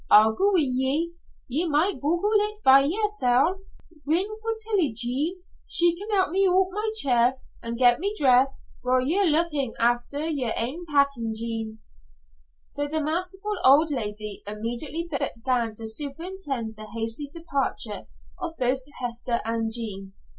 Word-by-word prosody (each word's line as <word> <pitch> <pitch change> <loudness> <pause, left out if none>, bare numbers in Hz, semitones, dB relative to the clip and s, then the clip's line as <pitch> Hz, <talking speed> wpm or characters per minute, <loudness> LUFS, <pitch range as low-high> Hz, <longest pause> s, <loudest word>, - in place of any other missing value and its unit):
I'll 215 +1 +7
go 400 - +2
wi' 360 - +4
ye. 270 +5 0 0.4
Ye 305 +8 0
might 315 +1 +1
boggle 345 +8 +1
it 420 0 +1
by 265 +1 +8
yersel'. 360 - +1 0.5
Ring 375 +8 +1
for 450 0 -2
Tillie, 410 - 0
Jean. 280 +10 -2 0.2
She 345 0 +3
can 405 +5 -8
help 380 -5 +2
me 390 +2 +3
oot 370 +1 +3
o' - - -15
my 425 +3 -2
chair 255 - +3 0.2
an' 230 0 -4
get 245 0 +4
me 400 +4 -1
dressed, 270 -1 +3 0.2
while 250 +1 +2
ye're 370 +7 +3
lookin' 300 -5 +1
after 240 +5 +1
yer 280 -8 0
ain 295 +10 -2
packin', 280 -7 +1
Jean." 225 -1 -4 0.8
So 290 0 -3
the 315 +2 -2
masterful 365 +7 -2
old 300 +4 +6
lady 210 -5 -3
immediately 240 +10 -4
began 245 -6 -1
to 225 - -7
superintend 275 - -4
the 215 0 -9
hasty 225 +6 -4
departure 280 - -3 0.3
of 325 - -5
both 255 +1 0 0.2
Hester 240 -1 -2
and 225 0 -1
Jean. 200 -4 -6
280 Hz, 150 wpm, -25 LUFS, 235-345 Hz, 0.8 s, by